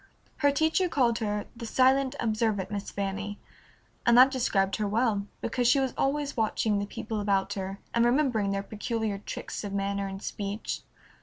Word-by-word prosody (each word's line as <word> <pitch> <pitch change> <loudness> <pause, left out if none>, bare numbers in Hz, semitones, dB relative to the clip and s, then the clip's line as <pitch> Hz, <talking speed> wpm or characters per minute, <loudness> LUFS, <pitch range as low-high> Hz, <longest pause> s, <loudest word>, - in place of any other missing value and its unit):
Her 285 -2 +4
teacher 320 +5 +2
called 240 -6 +2
her 210 -2 -2
"the 230 -1 -6
silent, 260 +2 +3
observant 215 -4 0
Miss 200 -1 -4
Fanny," 200 +1 -3 0.7
and 235 0 +5
that 260 +2 +8
described 195 -7 +1
her 210 -2 0
well, 210 -2 +1
because 245 +1 0
she 275 +3 +5
was 265 -2 0
always 285 +1 0
watching 215 -2 +1
the 200 - -3
people 215 +1 -4
about 200 -1 +1
her, 195 0 -4 0.2
and 235 - +3
remembering 240 -5 +2
their 195 0 -1
peculiar 215 -1 -3
tricks 210 - -6
of 200 -1 -5
manner 200 0 -1
and 195 0 -6
speech. 205 +1 -4
220 Hz, 170 wpm, -28 LUFS, 200-250 Hz, 0.7 s, that